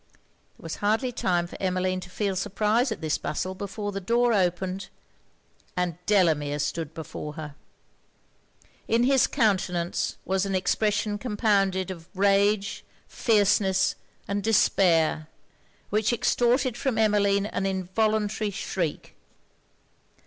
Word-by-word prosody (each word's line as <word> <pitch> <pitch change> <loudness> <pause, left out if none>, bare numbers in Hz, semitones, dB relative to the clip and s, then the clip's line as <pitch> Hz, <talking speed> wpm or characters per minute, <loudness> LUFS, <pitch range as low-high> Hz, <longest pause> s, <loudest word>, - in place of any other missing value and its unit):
There - - -19
was 165 - -5
hardly 220 +5 +1
time 175 -6 0
for 175 - -11
Emmeline 185 0 0
to 180 - -10
feel 195 +1 -2
surprise 210 +6 +1
at 220 - -4
this 155 -2 -1
bustle, 185 +5 -3
before 205 +2 -5
the 195 0 -5
door 235 +4 +2
opened, 185 0 -1 0.9
and 180 -2 0
Delamere 155 -8 +2
stood 150 +2 -3
before 150 -1 -6
her! 150 -1 -7 1.3
In 230 +1 +2
his 265 0 +4
countenance 185 - 0
was 190 0 0
an 195 -1 -1
expression 205 +2 0
compounded 200 -5 +1
of 170 -2 -10
rage, 200 +1 +2 0.2
fierceness 195 -3 +2 0.3
and 200 +1 -1
despair, 165 -7 +3 0.6
which 215 +2 +2
extorted 245 +1 +1
from 260 -2 -1
Emmeline 205 -2 +3
an 195 -2 -2
involuntary 210 +3 0
shriek! 180 -4 -4
195 Hz, 120 wpm, -26 LUFS, 180-215 Hz, 1.3 s, his